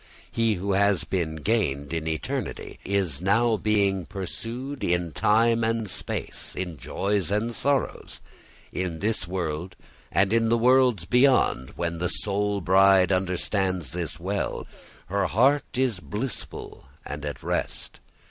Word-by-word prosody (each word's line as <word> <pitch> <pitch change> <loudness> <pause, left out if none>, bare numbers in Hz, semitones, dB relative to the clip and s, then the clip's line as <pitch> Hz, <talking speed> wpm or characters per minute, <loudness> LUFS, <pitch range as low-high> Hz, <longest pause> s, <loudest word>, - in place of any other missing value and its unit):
He 115 -2 +2
who 100 +2 -2
has 100 -2 +3
been 85 -4 -2
gained 75 -6 0
in 80 -1 -2
eternity 80 -2 -4
is 95 -7 0
now 110 +5 +3
being 100 -4 +1
pursued 115 +8 -5
in 85 -1 0
time 115 +4 +3
and 115 -1 0
space, - - -4
in 90 -4 -4
joys 100 0 -1
and 105 +4 0
sorrows, 140 +4 -1 0.5
in 90 -3 -2
this 105 0 -1
world 90 -1 -3 0.4
and 95 +2 +3
in 115 -1 +3
the 115 - +4
worlds 125 -6 +4
beyond. 125 - +3
When 85 -1 -2
the 90 +1 0
soul 100 0 -1
bride 95 +1 +5
understands 95 - 0
this 80 -2 -4
well, 100 +4 -2 0.4
her 100 +4 0
heart 135 +6 +2
is 125 -7 +1
blissful 105 - -6 0.2
and 75 +1 -6
at 75 -1 -5
rest. - - -3
100 Hz, 135 wpm, -26 LUFS, 85-115 Hz, 0.5 s, bride